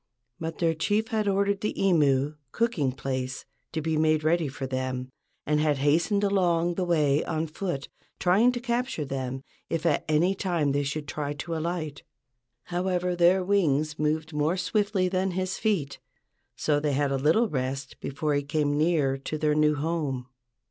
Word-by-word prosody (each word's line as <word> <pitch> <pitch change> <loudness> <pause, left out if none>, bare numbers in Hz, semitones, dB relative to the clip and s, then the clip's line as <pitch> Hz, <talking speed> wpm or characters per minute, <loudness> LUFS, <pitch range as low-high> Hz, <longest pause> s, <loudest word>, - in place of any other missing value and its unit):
But 165 0 -4
their 165 -1 +2
chief 210 +8 0
had 215 -3 0
ordered 200 0 +1
the 210 - -2
imu 150 -6 +2 0.2
(cooking 210 - 0
place) 130 0 -4 0.3
to 160 - -2
be 160 -1 0
made 155 0 +2
ready 165 0 +2
for 135 0 -5
them, 130 -1 -3 0.4
and 150 0 +2
had 150 -2 +2
hastened 165 +9 +2
along 175 -4 +2
the 185 - -1
way 150 -4 +2
on 160 0 -1
foot, 155 -3 -4 0.3
trying 200 +8 +4
to 245 - -3
capture 240 - -1
them 130 -1 -4 0.3
if 165 0 -2
at 155 -4 +2
any 165 +5 +3
time 175 -7 0
they 140 +1 +1
should 145 +1 -3
try 145 0 -3
to 165 +3 -5
alight. 160 -3 -3 0.6
However, 180 +1 -1
their 175 +2 +4
wings 155 -6 +1
moved 155 +1 0
more 150 +4 +1
swiftly 200 -1 +1
than 185 +1 0
his 185 0 -2
feet, 185 -11 0 0.6
so 150 -1 +1
they 145 -1 0
had 140 0 +1
a - - +1
little 160 - +3
rest 135 -3 -3
before 150 +2 -2
he 145 - +2
came 145 0 0
near 150 -5 +2
to 155 +3 -4
their 150 0 +2
new 150 0 +3
home. 145 -4 -2
155 Hz, 170 wpm, -27 LUFS, 145-180 Hz, 0.6 s, trying